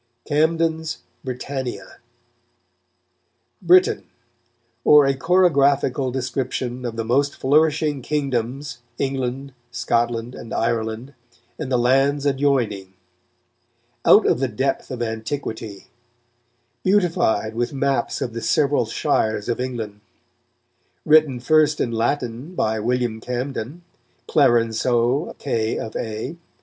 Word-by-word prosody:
CAMDEN'S 160 +1 0 0.2
"BRITANNIA" 125 -5 -5 1.6
BRITAIN: 180 +1 +4 0.8
_or 150 -2 +7
a 135 - +3
chorographical 140 -5 +2
description 125 -1 -3
of 115 -2 -4
the 115 0 -3
most 140 +5 +1
flourishing 150 0 +2
Kingdomes, 135 -1 -2 0.2
England, 135 0 -3 0.2
Scotland 120 0 -1
and 115 - -7
Ireland, 115 +3 -2 0.5
and 140 -4 -4
the 125 - +3
Ilands 135 +4 +2
adioyning; 130 -9 0 1.1
out - - +6
of - - +2
the 135 - +1
depth 130 +4 -2
of 125 -2 -3
Antiquitie: 110 -2 -5 0.9
beautified 165 - +1
with 120 +4 -1
Mappes 140 -1 -1
of 120 - -5
the 115 - -5
severall 145 -5 +2
Shires 110 -1 0
of 120 - -1
England; 110 -5 -5 1.0
Written 155 -5 +4
first 155 +3 +3
in 120 - 0
Latine 120 +6 -2
by 110 -6 0
William 120 0 -1
Camden, 130 +5 -4 0.4
Clarenceux 120 +1 +2
K. 115 -5 -1
of 110 - -6
A. 110 +8 -4
130 Hz, 105 wpm, -22 LUFS, 115-145 Hz, 1.6 s, or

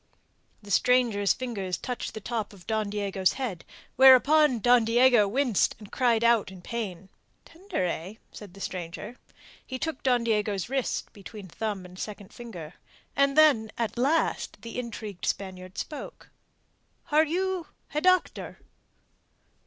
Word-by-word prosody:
The 205 - -9
stranger's 230 -3 +3
fingers 200 -8 -3
touched 250 -1 -5
the - - -4
top 220 -1 -3
of 185 -4 -16
Don 215 -2 -1
Diego's 200 -2 0
head, 235 -11 -4 0.3
whereupon 265 +2 +7
Don 245 +1 +4
Diego 235 -1 +5
winced 245 -1 +1
and 210 -2 -13
cried 235 -3 +2
out 235 -4 +3
in 185 -2 -12
pain. 195 -5 -5 0.4
"Tender, 345 - -4
eh?" 180 +3 -4 0.2
said 200 -3 -11
the 195 - -12
stranger. 180 +7 -6 0.5
He 260 - -6
took 315 +1 -4
Don 245 -3 +2
Diego's 210 -3 0
wrist 270 -1 -2
between 205 0 -10
thumb 200 +1 -4
and 180 +1 -12
second 205 -2 -7
finger. 180 -10 -9 0.4
And 280 +1 +2
then, 265 -9 +5
at 230 -2 -2
last, 280 +7 0
the 230 +1 -5
intrigued 215 -5 -6
Spaniard 185 -1 -4
spoke. 300 - -7 0.8
"Are 305 +1 +5
you 365 +2 -2 0.3
a 300 - 0
doctor?" 370 +1 +1
225 Hz, 140 wpm, -27 LUFS, 200-260 Hz, 0.8 s, whereupon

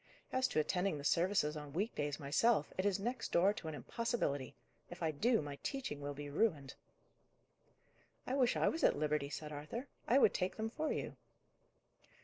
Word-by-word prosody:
As 260 0 +3
to 155 - 0
attending 180 +2 +1
the 140 - -7
services 165 -1 +2
on 150 -2 -7
week 205 +8 -1
days 145 0 -2
myself, 150 +5 +2
it 185 +2 +1
is 200 -1 +1
next 240 +4 -3
door 190 +4 +4
to 185 - -7
an 155 - -4
impossibility. 145 - -2 0.3
If 175 0 -7
I 160 - +2
do, 225 - +2
my 145 -1 -6
teaching 255 - -3
will 145 0 -4
be 145 +1 -6
ruined." 145 -4 0 1.5
"I 255 - -2
wish 255 -3 +3
I - - +2
was 325 - 0
at - - +5
liberty," 150 -1 0
said 150 +1 -6
Arthur; 150 - -5 0.2
"I 245 - +5
would 245 - +6
take 185 0 -1
them 220 0 -2
for 310 +5 -1
you." - - -3
170 Hz, 185 wpm, -36 LUFS, 145-225 Hz, 1.5 s, would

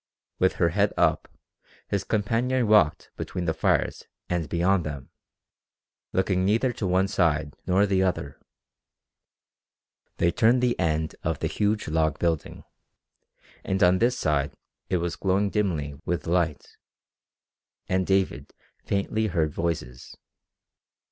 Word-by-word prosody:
With - - +3
her - - +2
head - - +1
up, - - +2 0.6
his 100 -1 -1
companion 115 +4 0
walked 105 -8 +3
between 90 - -4
the 80 - +1
fires - - 0 0.2
and 85 -4 -1
beyond 90 +1 +2
them, 70 -4 -7 1.0
looking 95 -1 +1
neither 115 +6 +2
to 110 -4 -3
one 95 +2 +2
side 75 -6 +1
nor 95 +3 +4
the 95 -2 +1
other. 90 -7 -2 1.8
They 85 0 +2
turned 115 +7 +3
the 120 -1 +1
end 80 -2 0
of - - -1
the - - -4
huge 105 +1 0
log 80 -1 +1
building 85 -3 -2 1.0
and 95 -1 0
on 90 +1 +5
this 120 +2 +2
side 75 -6 0 0.3
it 90 - +2
was 85 0 -2
glowing 100 +2 0
dimly 85 -9 -1
with 85 - -2
light, 85 -4 -1 1.1
and 95 0 0
David 95 -1 0 0.3
faintly 110 +2 -1
heard 80 -6 0
voices. 80 -7 -4
90 Hz, 130 wpm, -26 LUFS, 80-100 Hz, 1.8 s, on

